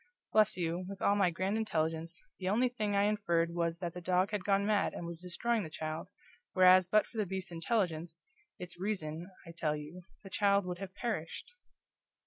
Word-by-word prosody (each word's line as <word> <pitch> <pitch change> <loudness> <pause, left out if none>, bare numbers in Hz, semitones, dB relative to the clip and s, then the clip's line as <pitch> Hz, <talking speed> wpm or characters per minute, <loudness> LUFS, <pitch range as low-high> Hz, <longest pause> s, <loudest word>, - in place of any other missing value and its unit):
bless 215 -2 +4
you, 170 +1 -1
with 200 -1 -7
all 200 - +3
my 195 -3 +4
grand 185 +4 -1
intelligence, 165 -5 -1 0.2
the 185 -1 -1
only 235 +6 +3
thing 215 -4 -2
I 200 - +4
inferred 170 -5 +1
was 170 -1 0
that 170 -1 -4
the 180 - -7
dog 185 +3 +2
had 205 -3 -2
gone 200 +1 +2
mad 210 -1 +1
and 175 - -5
was 170 0 -6
destroying 220 +6 0
the 165 - -5
child, 155 +1 -4 0.5
whereas 185 -1 +7
but 215 +3 +4
for 225 - -7
the 210 - +2
beast's 190 -1 -4
intelligence 170 -3 -1 0.3
it's 175 -1 -9
REASON, 175 -4 -3 0.2
I 170 - -9
tell 160 -3 -1
you! 150 +4 -8 0.2
the 195 - -11
child 200 -1 +3
would 180 -1 -4
have 195 -1 -7
perished!" 215 - -4
180 Hz, 195 wpm, -33 LUFS, 170-205 Hz, 0.5 s, whereas